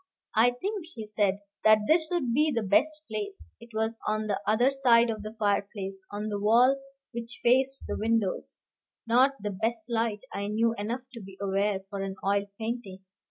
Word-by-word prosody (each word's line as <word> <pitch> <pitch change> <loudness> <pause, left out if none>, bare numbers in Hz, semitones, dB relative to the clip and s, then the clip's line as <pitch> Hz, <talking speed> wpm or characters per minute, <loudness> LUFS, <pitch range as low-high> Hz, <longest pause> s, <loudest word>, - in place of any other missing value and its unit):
"I 225 +3 +5
think," 400 -1 -3
he 220 -2 -6
said, 205 -2 0 0.2
"that 215 0 +7
this 320 0 +4
would 270 -10 0
be 300 +4 +3
the 230 -5 0
best 300 +10 +2
place." 410 -2 -5
It 235 - -14
was 220 +1 -2
on 215 0 0
the 205 -2 -1
other 240 +5 +4
side 240 -4 +4
of 215 -1 -5
the 215 +1 -7
fireplace, 200 -2 -1
on 210 +1 -4
the 205 -1 -2
wall 245 +6 +4 0.3
which 235 0 -7
faced 265 +2 +3
the - - -2
windows, 220 -3 0 0.5
not 250 +4 +4
the 205 0 -3
best 225 +4 -2
light, 225 -2 0
I 200 0 -3
knew 225 +2 +2
enough 230 +5 -3
to 230 - -8
be 190 -1 -12
aware, 200 0 0
for 200 0 -5
an 195 0 -4
oil 200 +1 +1
painting. 220 -4 -5
220 Hz, 185 wpm, -28 LUFS, 205-245 Hz, 0.5 s, that